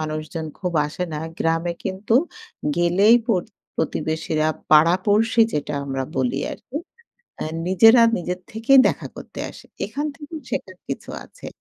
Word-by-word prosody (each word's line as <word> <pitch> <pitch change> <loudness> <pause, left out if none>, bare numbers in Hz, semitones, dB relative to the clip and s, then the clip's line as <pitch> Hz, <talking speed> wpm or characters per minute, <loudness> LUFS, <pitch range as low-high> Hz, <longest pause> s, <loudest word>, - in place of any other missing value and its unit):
মানুষজন 155 +1 -4
খুব 180 -2 -2
আসে 155 +4 -4
না। 150 - -3 0.2
গ্রামে 165 +1 0
কিন্তু 195 +4 -3 0.6
গেলেই 180 +6 +5
প্রত 190 -8 +1 0.3
প্রতিবেশীরা, 160 0 -1 0.2
পাড়া-পড়শী 190 +9 +4
যেটা 150 0 -2
আমরা 135 -1 -2
বলি 130 0 0 0.2
আরকি। 265 - -9 0.6
অ্যাঁ 155 - -4
নিজেরা 225 +6 +7
নিজের 180 +1 -3
থেকেই 230 +5 +4
দেখা - - -3
করতে - - -10
আসে। - - -14 0.2
এখান 290 +2 -3
থেকেও 305 +1 -9
শেখার 185 -1 -4
কিছু 135 - -5
আছে। - - -13
175 Hz, 135 wpm, -22 LUFS, 155-220 Hz, 0.6 s, নিজেরা